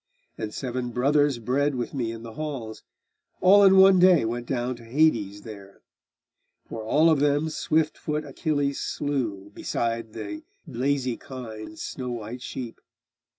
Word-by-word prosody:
And 110 -1 -5
seven 125 0 -4
brothers 140 +3 +2
bred 135 +5 0
with 120 -1 -4
me 120 -5 -2
in 115 0 -8
the 115 -1 -9
halls, 135 -8 -5 0.6
All 200 +2 +7
in 195 -1 +7
one 190 -1 +7
day 180 -7 +6
went 120 +1 -3
down 125 -1 -1
to 120 - -14
Hades 115 -6 +1
there; 100 -3 -12 0.8
For 110 - -6
all 155 +9 +4
of 155 - +3
them 145 +2 +2
swift 155 0 0
foot 150 0 -3
Achilles 140 0 -1
slew 115 -9 -3
Beside 115 -1 -3
the 315 -1 -6 0.2
lazy 130 -2 -1
kine 115 -5 -8
and 160 - -13
snow 130 -5 -5
white 120 +2 -6
sheep. 125 -2 -7
130 Hz, 150 wpm, -25 LUFS, 115-150 Hz, 0.8 s, All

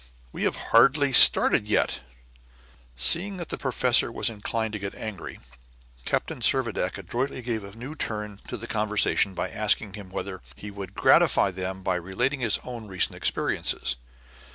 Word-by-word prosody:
We - - -3
have - - 0 0.2
hardly 135 +4 +5
started - - +7
yet." - - +1 0.9
Seeing 175 - +2
that 170 -3 -6
the - - -4
professor 125 -2 +2
was 115 - +1
inclined 110 +1 -3
to 105 - -4
get 100 0 -6
angry, 110 -3 -7 0.7
Captain - - -2
Servadac - - 0
adroitly 130 +1 -4
gave 115 -3 -3
a 100 +1 -11
new 125 +6 -8
turn 105 -8 -5
to 125 - -5
the 115 - -8
conversation 105 -3 +1
by - - -3
asking 105 -1 0
him 100 -3 -9
whether 95 0 -6
he 105 - -9
would 100 -1 -9
gratify 100 - +4
them 95 +1 -6
by 90 -1 0
relating 120 +11 -2
his 115 -4 +1
own 120 -3 -8
recent 95 -2 0
experiences. - - -1
110 Hz, 155 wpm, -25 LUFS, 100-125 Hz, 0.9 s, started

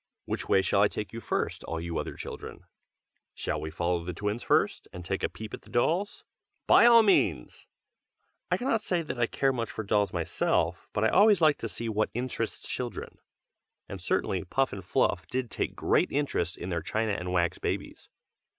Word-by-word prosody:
Which - - -4
way 95 - +4
shall 100 +1 +2
I 105 - +6
take 105 +1 -6
you 115 - -5
first, - - -2
all 85 - -3
you 85 0 -3
other - - -5
children? - - -8 0.7
shall - - -3
we 80 - -4
follow 85 +1 -1
the 90 0 -5
twins 105 +5 -2
first, - - +1
and 90 -1 -9
take 95 +2 -2
a - - 0
peep 110 -1 -9
at - - -6
the - - -18
dolls? 170 +11 0 0.4
by 235 - +7
all 230 -1 +8
means! 200 - +1 0.8
I - - +2
cannot 245 -3 0
say 180 -4 0
that 140 -5 -5
I 120 - +3
care 135 +2 +1
much 115 -3 -3
for 110 - -5
dolls 100 -2 +1
myself, 85 -3 0
but 105 - -1
I 110 - +4
always 205 0 +5
like 155 -3 +4
to 115 - -4
see 115 +2 -5
what 110 -1 0
interests 120 -2 -3
children, 125 -2 -5 0.7
and - - -7
certainly 95 -3 0
Puff 135 +9 0
and 95 - -6
Fluff - - +1
did 125 -2 -3
take - - -2
great - - +2
interest 135 - -1
in 90 - -6
their 85 -2 -1
china 110 +6 -1
and 90 -2 -3
wax 85 -2 +1
babies. - - -4
110 Hz, 195 wpm, -28 LUFS, 90-135 Hz, 0.8 s, all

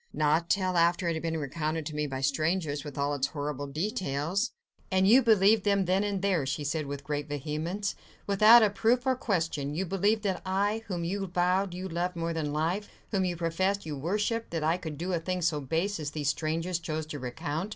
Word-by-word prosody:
"Not 155 +3 +2
till 185 -2 +1
after 170 +1 +3
it 170 - +1
had 160 - -3
been 165 -1 -2
recounted 155 +2 -2
to 155 - -5
me 150 0 -1
by 135 -1 -4
strangers, 150 +1 0
with 145 -2 -8
all 140 +1 0
its 140 -1 0
horrible 145 -1 -4
details." 165 - -1 0.4
"And 190 0 +3
you 245 +6 +7
believed 215 -2 +5
them 200 -2 +2
then 185 +3 +2
and 200 -2 -2
there," 190 -7 +2
she 145 +2 -2
said 150 +1 -2
with 140 0 -5
great 145 0 -3
vehemence, 155 +8 -3 0.3
"without 215 +4 +7
a 210 - +3
proof 230 +5 +2
or 260 -1 +3
question—you 165 - -1
believed 200 +4 +1
that 190 -3 -1
I, 200 +4 0
whom 175 -4 -3
you 195 +3 -2
vowed 180 +1 +1
you 185 +1 -4
loved 175 +1 -2
more 165 0 -2
than 155 -3 -2
life, 165 +7 -1 0.2
whom 195 -3 +1
you 175 -1 -2
professed 185 +4 0
you 155 -2 -4
worshipped, 210 - -1
that 165 -2 -2
I 160 +2 +3
could 160 -5 -6
do 180 +4 -3
a 170 - +1
thing 180 +2 -2
so 155 -2 +1
base 165 +9 -1
as 150 -2 -3
these 145 -1 -1
strangers 165 +4 -1
chose 160 -2 -3
to 150 -2 -6
recount. 150 +8 -4
170 Hz, 215 wpm, -29 LUFS, 150-195 Hz, 0.4 s, you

